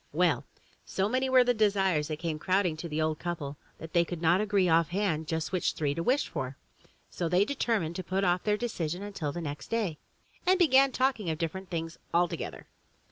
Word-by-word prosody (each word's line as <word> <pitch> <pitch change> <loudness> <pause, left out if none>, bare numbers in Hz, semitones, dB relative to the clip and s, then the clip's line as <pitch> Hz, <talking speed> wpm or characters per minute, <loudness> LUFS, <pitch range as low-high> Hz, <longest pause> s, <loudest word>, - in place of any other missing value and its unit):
Well, - - +2 0.4
so 190 +1 -1
many 260 +4 0
were 260 -1 +6
the 245 0 +2
desires 195 -8 +2
that 155 -1 -3
came 160 -1 -3
crowding 185 -1 +1
to 170 +1 -6
the 150 0 -2
old 155 0 0
couple, 150 -5 -4 0.2
that 160 0 -10
they 170 -1 +5
could 170 0 -5
not 175 +4 +3
agree 205 -3 +2
off 165 -1 +4
hand 185 -4 0
on 160 - -8
just 160 +1 -2
which 185 -3 0
three 145 -2 -1
to 165 - -3
wish 260 +10 +2
for. 130 +1 -5 0.5
So 170 - -2
they 180 +4 +4
determined 215 - -1
to 185 - -4
put 190 +3 -1
off 180 -1 +2
their 210 -1 +1
de 240 - -2
cision 175 -4 -3
until 195 -8 -4
the 175 - -5
next 145 -3 -5
day 205 -9 -1 0.4
and 370 +1 +4
began 275 -6 +5
talking 255 -8 0
of 160 - -1
different 175 +3 -4
things 165 -1 -4 0.2
altogether. 175 -1 -1
175 Hz, 215 wpm, -29 LUFS, 160-210 Hz, 0.5 s, were